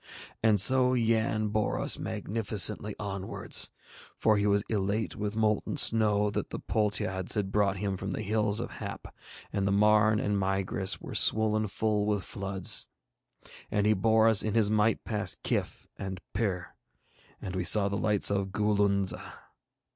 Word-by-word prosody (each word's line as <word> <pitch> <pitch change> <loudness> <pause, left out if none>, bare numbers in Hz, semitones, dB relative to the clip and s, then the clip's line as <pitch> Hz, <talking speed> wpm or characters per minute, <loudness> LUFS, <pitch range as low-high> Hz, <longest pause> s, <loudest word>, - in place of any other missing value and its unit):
And 110 -2 +3
so 130 +4 +5
Yann 110 -2 0
bore 105 0 -1
us - - +1
magnificently 105 -1 -2
onwards, 100 -2 0 0.5
for 110 -1 +2
he 100 0 0
was 100 0 +2
elate 105 +1 -2
with 105 0 -4
molten 110 -2 -1
snow 105 -2 +3
that - - -4
the - - -6
Poltiades 100 -3 -1
had 100 -2 -2
brought 100 -1 +1
him 100 -1 -3
from 95 +1 -6
the 105 +3 -4
Hills 105 0 0
of 120 - -5
Hap, - - -8 0.4
and 100 -1 -1
the - - +1
Marn 105 +1 +3
and 105 0 -1
Migris 95 0 -2
were - - -9
swollen 110 0 +2
full 105 +1 -1
with 105 -3 -1
floods; 95 -1 +1 0.8
and 105 -1 0
he 105 - +4
bore 110 +2 +3
us 110 -3 +4
in 110 0 -3
his 110 -2 +2
might 110 +1 +1
past 105 -2 -3
Kyph - - -3
and 95 -1 -6
Pir, 95 -5 -3 0.7
and 95 -1 -7
we 90 - -2
saw 100 +2 +6
the 100 - -3
lights 105 -1 +1
of 100 -1 -1
Goolunza. 100 -1 0
105 Hz, 160 wpm, -28 LUFS, 100-110 Hz, 0.8 s, saw